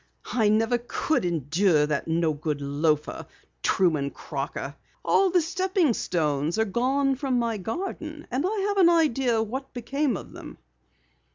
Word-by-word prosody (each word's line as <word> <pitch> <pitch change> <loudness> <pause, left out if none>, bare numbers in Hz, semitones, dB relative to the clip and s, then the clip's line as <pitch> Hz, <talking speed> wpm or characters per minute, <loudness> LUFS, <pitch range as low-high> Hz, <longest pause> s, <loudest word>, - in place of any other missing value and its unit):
"I 225 -4 +3
never 225 +3 +2
could 245 - -1
endure 160 0 +2
that 150 0 -2
no 165 -1 +1
good 150 0 -3
loafer, 145 +2 -1 0.3
Truman 160 -8 +2
Crocker! - - -5 0.3
All 390 -1 +4
the 355 -2 +3
stepping 370 -4 +1
stones 155 -4 -1
are 220 - +2
gone 265 +6 +1
from 265 -1 -1
my 230 -2 0
garden, 310 - -5
and 255 +3 0
I 405 +4 0
have 405 - -1
an 345 -2 +7
idea 270 -9 +2
what 265 +5 -6
became 265 0 -1
of - - -10
them!" - - -10
230 Hz, 150 wpm, -26 LUFS, -, 0.3 s, an